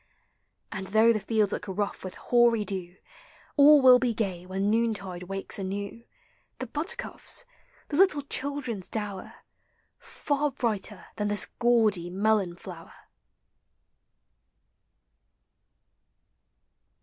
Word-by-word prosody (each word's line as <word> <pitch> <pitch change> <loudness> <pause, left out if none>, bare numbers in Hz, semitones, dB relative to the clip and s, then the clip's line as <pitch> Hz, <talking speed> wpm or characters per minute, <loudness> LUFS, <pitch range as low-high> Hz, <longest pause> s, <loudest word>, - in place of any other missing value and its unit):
And, 190 -3 -5
though 220 +3 +5
the 215 - -1
fields 210 0 +1
look - - -4
rough 200 +1 -3
with 185 -1 -7
hoary 235 -3 +3
dew, 185 -3 -4 0.6
All 290 -1 +7
will 250 -1 +8
be 245 -3 0
gay 185 -5 -3
when 190 +2 -1
noontide 210 -5 -1
wakes 195 +1 -4
anew 200 +4 -5 0.5
The 255 - -4
buttercups, 340 - -3 0.4
the 290 - -2
little 365 -6 +4
children's 265 -8 -3
dower, 205 -3 -4 0.6
Far 290 0 -2
brighter 215 -7 -3
than 210 -1 -1
this 205 0 0
gaudy 220 -7 +3
melon 195 -1 +1
flower! - - -11
215 Hz, 105 wpm, -27 LUFS, 195-245 Hz, 0.6 s, will